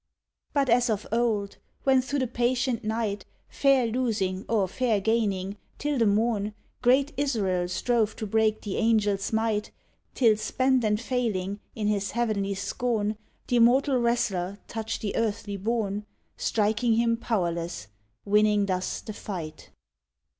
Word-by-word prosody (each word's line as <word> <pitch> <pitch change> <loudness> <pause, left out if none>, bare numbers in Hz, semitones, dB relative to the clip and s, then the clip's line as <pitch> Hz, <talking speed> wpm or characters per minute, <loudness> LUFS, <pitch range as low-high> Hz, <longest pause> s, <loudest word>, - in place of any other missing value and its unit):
But 280 -2 +1
as 245 +1 +3
of 215 -1 -1
old, 220 -4 0 0.3
when 265 -1 +4
through 280 +3 -3
the 260 - +1
patient 245 0 0
night, 215 -2 -2 0.3
Fair 275 -3 +3
losing 215 -6 -1
or 210 -4 +2
fair 225 +1 +1
gaining, 200 -2 0 0.2
till 290 -2 -1
the 225 - +4
morn, 210 0 +1 0.3
Great 265 +4 +3
Israel 200 -11 0
strove 220 +3 0
to 220 - -4
break 215 +1 +1
the 205 - -3
angel's 210 -3 +2
might, 220 -1 0 0.5
Till 225 -5 +4
spent 255 +4 +1
and 210 -1 +1
failing, 215 -6 -2 0.2
in 215 - -3
his 205 -1 0
heavenly 210 -4 -1
scorn, 215 +2 -1 0.3
Th' - - -4
immortal 250 +3 +4
wrestler 205 -6 0
touched 225 0 -4
the 205 - -3
earthly 215 -2 -1
born, 210 0 -2 0.3
Striking 220 +2 +1
him 230 +1 +2
powerless, 170 - -2 0.4
winning 210 0 +3
thus 185 -1 -2
the 215 - -7
fight. 170 -7 -7
220 Hz, 140 wpm, -27 LUFS, 200-240 Hz, 0.5 s, when